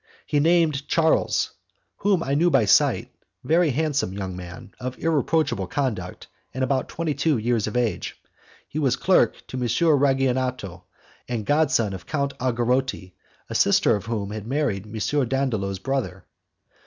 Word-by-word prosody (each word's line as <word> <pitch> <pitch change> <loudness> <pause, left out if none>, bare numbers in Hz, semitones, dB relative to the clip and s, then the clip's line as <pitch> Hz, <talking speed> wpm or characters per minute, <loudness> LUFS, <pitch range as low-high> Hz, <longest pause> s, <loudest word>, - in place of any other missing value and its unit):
He 145 - +1
named 160 -3 +2
Charles 160 -1 +2 0.5
whom 195 -4 +1
I 140 - -1
knew 165 +5 +3
by 135 -8 +3
sight 100 - +3 0.3
very 165 +1 +3
handsome 140 -7 0
young 95 -2 -5
man, 90 +1 -10
of 130 0 -5
irreproachable 160 0 0
conduct, 115 - -3 0.3
and 130 - -1
about 130 0 0
twenty 165 -2 -2
two 145 +1 +1
years 115 -1 0
of 110 - -2
age. 120 -3 -2 0.5
He 155 - -4
was 135 -4 +2
clerk 190 - +2
to 130 - -7
M. 125 - -2 0.4
Ragionato 130 -9 0 0.4
and 115 -4 -3
god 150 +3 +3
son 115 -6 +1
of 95 - -9
Count 140 -2 -1
Algarotti, 125 -5 -1 0.3
a - - -7
sister - - +4
of 105 - -6
whom 105 -3 -3
had 110 0 -6
married 125 -8 -1
M. 110 +6 -1
Dandolo's 115 -7 -1
brother. 125 -5 -3
130 Hz, 155 wpm, -24 LUFS, 110-145 Hz, 0.5 s, sister